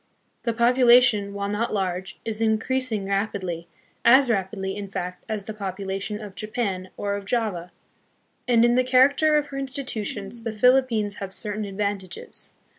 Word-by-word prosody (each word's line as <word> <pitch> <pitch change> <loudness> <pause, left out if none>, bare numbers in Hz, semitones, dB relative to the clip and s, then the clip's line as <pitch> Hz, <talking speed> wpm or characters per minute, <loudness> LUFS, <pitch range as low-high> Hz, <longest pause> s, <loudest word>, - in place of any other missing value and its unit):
The 235 - +1
population, 240 -3 +5
while 200 0 -3
not 210 +2 -1
large, 190 -1 -3
is 225 -1 -3
increasing 225 0 0
rapidly, 195 -4 -2 0.4
as 255 +1 +6
rapidly, 195 -1 -2
in 205 -1 -5
fact, 180 -1 -5
as 215 -2 -2
the 215 - -6
population 195 +1 -4
of 210 -3 -8
Japan 195 -2 -3
or 200 0 -2
of 200 0 -4
Java. 195 -6 -2 0.8
And 235 -1 +5
in 240 - +4
the 255 +1 +3
char 255 +1 +6
acter 305 +2 +2
of 295 -1 -1
her 275 -1 -5
institutions 235 -5 -3
the 225 -1 -4
Philippines 230 -3 +3
have 195 -1 -6
certain 210 +1 -3
advantages. 195 -2 -4
210 Hz, 155 wpm, -24 LUFS, 195-240 Hz, 0.8 s, as